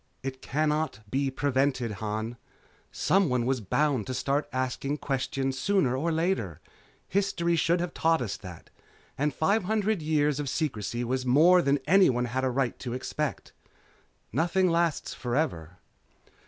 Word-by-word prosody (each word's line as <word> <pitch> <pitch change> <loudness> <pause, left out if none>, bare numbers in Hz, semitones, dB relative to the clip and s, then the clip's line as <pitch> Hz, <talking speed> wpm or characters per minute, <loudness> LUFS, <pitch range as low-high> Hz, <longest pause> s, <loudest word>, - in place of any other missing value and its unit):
"It 130 -1 -5
cannot 150 -6 -1
be 135 0 +1
prevented, 130 -3 0
Han. 110 +2 -3 0.5
Someone 140 -11 +2
was 130 -1 0
bound 135 +2 0
to 130 - -3
start 140 +3 -1
asking 130 +3 -2
questions 135 -1 -2
sooner 165 -7 +2
or 160 +6 0
later. 160 - -1 0.5
History 185 -4 +1
should 170 +2 +2
have 175 0 -3
taught 165 0 +2
us 115 -6 -3
that. 90 -5 -11 0.4
And 150 +2 0
five 190 - +1
hundred 215 -2 0
years 150 -2 +1
of 145 -2 -2
secrecy 120 - -2
was 130 +2 -1
more 160 +8 +5
than 140 -2 +2
anyone 150 -8 +4
had 130 +2 -2
a 130 - +2
right 130 -1 -1
to 120 -2 -5
expect. 140 +3 -4 0.8
Nothing 175 - +2
lasts 170 -2 0
forever." 90 - -2
140 Hz, 140 wpm, -28 LUFS, 125-165 Hz, 0.8 s, more